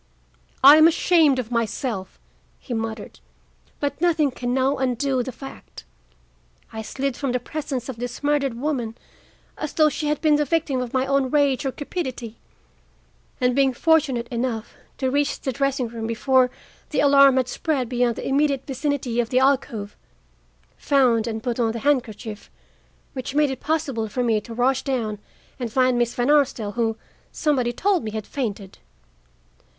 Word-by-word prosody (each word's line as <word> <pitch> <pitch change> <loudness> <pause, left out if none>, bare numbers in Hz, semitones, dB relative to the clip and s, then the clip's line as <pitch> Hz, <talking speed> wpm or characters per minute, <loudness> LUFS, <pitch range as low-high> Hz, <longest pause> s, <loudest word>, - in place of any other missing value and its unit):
"I 285 +3 +10
am 315 +1 +8
ashamed 325 -4 +3
of 245 -2 -4
myself," 230 -3 -3 0.4
he 250 - -7
muttered, 225 -2 -5 0.6
"but 285 +1 -3
nothing 315 -5 +2
can 245 -1 -4
now 265 +2 +1
undo 260 0 0
the 260 - -4
fact. 270 +2 -11 0.9
I 220 - -4
slid 270 +4 -3
from 270 -2 -2
the 250 - +1
presence 270 -1 -5
of 260 -4 -6
this 245 +3 -6
murdered 285 -4 +1
woman 250 -5 -2 0.6
as 305 - -4
though 310 -1 +4
she 300 0 -3
had 300 -1 0
been 305 -2 +3
the 295 - +2
victim 290 -3 0
of 245 -2 -5
my 260 0 +1
own 275 -1 +1
rage 280 -2 +2
or - - -1
cupidity; 260 -7 -5 1.0
and, 250 -1 +2
being 270 -1 +3
fortunate 270 -5 +2
enough 235 -2 -3 0.2
to 260 -1 -1
reach 285 +1 0
the 265 - -2
dressing 275 -1 -1
room 225 -1 -5
before 255 +2 +2 0.4
the - - -1
alarm 275 -2 +6
had 255 -2 +1
spread 270 -2 -1
beyond 245 -1 0
the - - -5
immediate 275 -1 +1
vicinity 270 -3 -2
of 235 -1 0
the 255 - 0
alcove, 255 -6 +1 0.8
found 245 -5 +2
and 220 -1 -4
put 245 -1 -2
on 225 -2 +1
the 230 - -4
handkerchief, 225 -6 -1 0.6
which 260 +1 -5
made 295 -2 +3
it 265 - -5
possible 275 -8 -1
for 250 +4 -2
me 225 -3 +1
to 235 - -12
rush 260 +2 +2
down 225 -6 -2 0.4
and 240 -3 -4
find 255 +1 +3
Miss 240 0 0
Van 245 +3 +1
Arsdale, 270 -8 +2
who, 225 0 -1 0.3
somebody 265 -6 0
told 385 +8 +1
me, 220 - -3
had 215 -1 -5
fainted. 205 -8 -5
260 Hz, 165 wpm, -23 LUFS, 235-280 Hz, 1.0 s, I